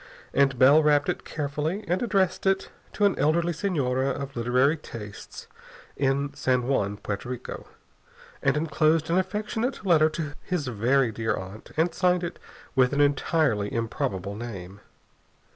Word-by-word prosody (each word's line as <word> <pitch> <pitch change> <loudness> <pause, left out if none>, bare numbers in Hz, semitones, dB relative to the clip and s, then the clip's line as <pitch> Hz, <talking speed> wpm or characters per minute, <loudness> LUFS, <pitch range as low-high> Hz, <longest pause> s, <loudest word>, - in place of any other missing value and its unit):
And 135 -2 +3
Bell 140 +5 +7
wrapped 150 -1 +3
it - - -2
carefully, 150 +6 -3
and 180 +2 0
addressed 195 -5 +1
it 195 0 +1 0.2
to 205 - +2
an 200 - +3
elderly 165 +4 +2
senora 140 -8 0
of 140 0 -4
literary 125 +5 +2
tastes 110 -9 -9 0.5
in 140 +1 0
San 125 -1 +1
Juan, 105 -6 0
Porto 100 +3 -5
Rico, 125 -1 -6 0.7
and - - +2
enclosed 155 +1 +1
an 180 - +4
affectionate 210 +5 -2
letter 160 -4 +5
to 150 -2 -4
his 180 -5 -2
very 125 +2 +2
dear 110 0 -1
aunt, 95 +3 -9
and 165 +1 +2
signed 180 0 +2
it 170 - -5 0.3
with 130 -1 +3
an 140 - 0
entirely 145 -6 +2
improbable 100 -4 -2
name. 100 -4 -7
140 Hz, 145 wpm, -26 LUFS, 120-165 Hz, 0.7 s, Bell